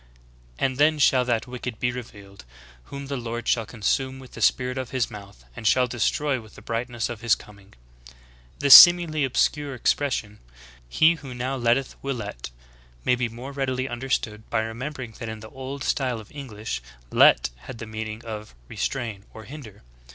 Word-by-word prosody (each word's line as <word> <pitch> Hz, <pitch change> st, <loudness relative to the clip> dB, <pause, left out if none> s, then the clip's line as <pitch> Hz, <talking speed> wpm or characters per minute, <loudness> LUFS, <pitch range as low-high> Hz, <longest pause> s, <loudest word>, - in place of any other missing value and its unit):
And 130 Hz, -, 0 dB
then 155 Hz, +2 st, +4 dB
shall 130 Hz, -3 st, +4 dB
that 120 Hz, -2 st, 0 dB
Wicked 125 Hz, -2 st, -6 dB
be 125 Hz, -, +1 dB
revealed, 100 Hz, -, -10 dB, 0.4 s
whom 140 Hz, 0 st, -8 dB
the 140 Hz, 0 st, -4 dB
Lord 120 Hz, -1 st, -5 dB
shall 115 Hz, -3 st, +1 dB
consume 130 Hz, +4 st, -1 dB
with 130 Hz, -1 st, -13 dB
the -, -, -9 dB
spirit 125 Hz, 0 st, +2 dB
of 130 Hz, -2 st, -5 dB
His 130 Hz, -2 st, -1 dB
mouth, 100 Hz, -, -12 dB
and 110 Hz, -, -3 dB
shall 130 Hz, +3 st, +4 dB
destroy 130 Hz, +3 st, 0 dB
with 110 Hz, -1 st, -16 dB
the -, -, -12 dB
brightness 115 Hz, 0 st, -2 dB
of 115 Hz, -2 st, -7 dB
His 115 Hz, -1 st, +4 dB
coming."'^ 100 Hz, -1 st, -16 dB, 0.3 s
7. -, -, -18 dB, 0.4 s
The 140 Hz, -, 0 dB
seemingly 170 Hz, -2 st, +10 dB
obscure 140 Hz, +2 st, 0 dB
expression, 120 Hz, -5 st, -1 dB, 0.5 s
"he 160 Hz, -, +5 dB
who 130 Hz, -4 st, -8 dB
now 130 Hz, +2 st, -2 dB
let 120 Hz, -2 st, +3 dB
teth 135 Hz, -1 st, -4 dB
will 135 Hz, -1 st, -2 dB
let," 105 Hz, -, -6 dB, 0.6 s
may -, -, +4 dB
be 125 Hz, -1 st, 0 dB
more 120 Hz, +4 st, -8 dB
readily 130 Hz, -2 st, -2 dB
understood 120 Hz, -4 st, -3 dB
by 110 Hz, -, +1 dB
remember 125 Hz, +5 st, -5 dB
ing 115 Hz, -, -9 dB
that 115 Hz, -, -5 dB
in 110 Hz, 0 st, -6 dB
the 110 Hz, -, -11 dB
older 135 Hz, +1 st, -6 dB
style 125 Hz, -4 st, 0 dB
of 105 Hz, -, -13 dB
English 110 Hz, -, -6 dB, 0.3 s
"let" -, -, +5 dB, 0.2 s
had 130 Hz, -, -7 dB
the 115 Hz, -, -7 dB
meaning 110 Hz, +1 st, -6 dB
of 110 Hz, -, -7 dB
"restrain" 115 Hz, -6 st, -3 dB
or 110 Hz, -, -9 dB
"hinder." 110 Hz, -4 st, -11 dB
120 Hz, 185 wpm, -25 LUFS, 110-135 Hz, 0.6 s, seemingly